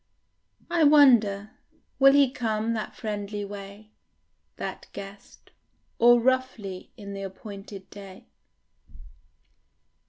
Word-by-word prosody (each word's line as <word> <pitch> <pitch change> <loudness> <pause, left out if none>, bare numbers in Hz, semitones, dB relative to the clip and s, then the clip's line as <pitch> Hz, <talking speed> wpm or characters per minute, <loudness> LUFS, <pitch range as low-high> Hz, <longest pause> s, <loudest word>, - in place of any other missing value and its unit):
I 340 -2 +3
wonder; 235 -9 +5 0.5
will 275 0 +7
he 280 -2 +4
come 225 -2 -2
that 220 -2 -5
friendly 205 -2 -4
way, 200 +1 -10 0.6
That - - -7
guest, 200 0 -12 0.5
or 240 +1 +6
roughly 235 -7 -1
in 200 -2 -8
the 195 - -6
appointed 195 0 -9
day? 195 -2 -12
210 Hz, 95 wpm, -26 LUFS, 200-240 Hz, 0.6 s, will